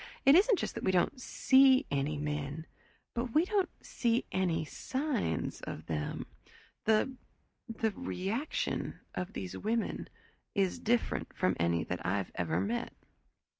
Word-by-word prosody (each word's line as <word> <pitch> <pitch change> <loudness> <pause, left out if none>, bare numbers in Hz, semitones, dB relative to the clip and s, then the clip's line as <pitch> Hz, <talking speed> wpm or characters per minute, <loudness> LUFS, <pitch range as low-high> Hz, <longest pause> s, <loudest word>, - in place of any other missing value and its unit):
"It 275 - +9
isn't 400 +6 +6
just - - -2
that - - -6
we 190 - +3
don't 185 +9 +1
see 265 +2 +5
any 145 +2 0
men 150 +1 -3 0.5
but 240 0 -3
we 315 +3 +5
don't 390 -2 +1 0.2
see 235 0 +1
any 175 -4 +1
signs 255 - -2
of 80 - -6
them. 75 -2 -3 0.6
The 220 +4 +3 0.5
the 225 -1 0
reaction 225 +4 -2
of 180 - -4
these 90 -2 -5
women 225 +2 -1 0.5
is 195 -3 +1
different 235 +1 0
from - - +2
any 85 -1 +2
that 90 +2 -4
I've 95 +2 -1
ever 85 - 0
met." 235 +4 -2
215 Hz, 135 wpm, -32 LUFS, -, 0.6 s, It